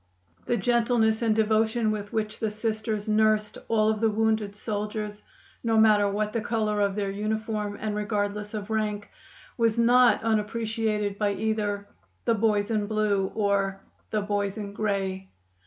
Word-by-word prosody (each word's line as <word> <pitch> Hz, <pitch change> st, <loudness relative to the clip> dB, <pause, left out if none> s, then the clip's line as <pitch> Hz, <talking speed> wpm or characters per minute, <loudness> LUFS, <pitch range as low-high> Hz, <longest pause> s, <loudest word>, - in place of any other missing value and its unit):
The 240 Hz, -, +2 dB
gentleness 230 Hz, 0 st, +2 dB
and 225 Hz, -2 st, +2 dB
devotion 220 Hz, +1 st, +2 dB
with 205 Hz, -1 st, -4 dB
which 215 Hz, -1 st, -2 dB
the 220 Hz, -, 0 dB
Sisters 215 Hz, 0 st, -3 dB
nursed 215 Hz, 0 st, +2 dB
all 215 Hz, -1 st, +3 dB
of 215 Hz, 0 st, -3 dB
the 225 Hz, -, +4 dB
wounded 215 Hz, -1 st, 0 dB
soldiers, 210 Hz, 0 st, -4 dB, 0.4 s
no 225 Hz, -1 st, +2 dB
matter 210 Hz, -2 st, +5 dB
what 210 Hz, +1 st, -1 dB
the 230 Hz, -, 0 dB
color 215 Hz, -2 st, 0 dB
of 200 Hz, -1 st, +1 dB
their 200 Hz, -2 st, -1 dB
uniform 215 Hz, 0 st, -2 dB
and 215 Hz, -1 st, -2 dB
regardless 210 Hz, 0 st, -2 dB
of 210 Hz, 0 st, -5 dB
rank, 210 Hz, -2 st, -2 dB, 0.5 s
was 230 Hz, -1 st, +2 dB
not 240 Hz, 0 st, +5 dB
unappreciated 215 Hz, -1 st, -1 dB
by 205 Hz, -1 st, +1 dB
either 205 Hz, -1 st, -2 dB, 0.4 s
"the 230 Hz, -, +3 dB
boys 210 Hz, -1 st, +1 dB
in 210 Hz, -2 st, 0 dB
blue" 210 Hz, -3 st, +1 dB
or 200 Hz, -2 st, +1 dB, 0.3 s
"the 215 Hz, -1 st, -1 dB
boys 205 Hz, 0 st, -1 dB
in 200 Hz, -2 st, -5 dB
gray." 195 Hz, -2 st, -2 dB
215 Hz, 155 wpm, -26 LUFS, 205-220 Hz, 0.5 s, matter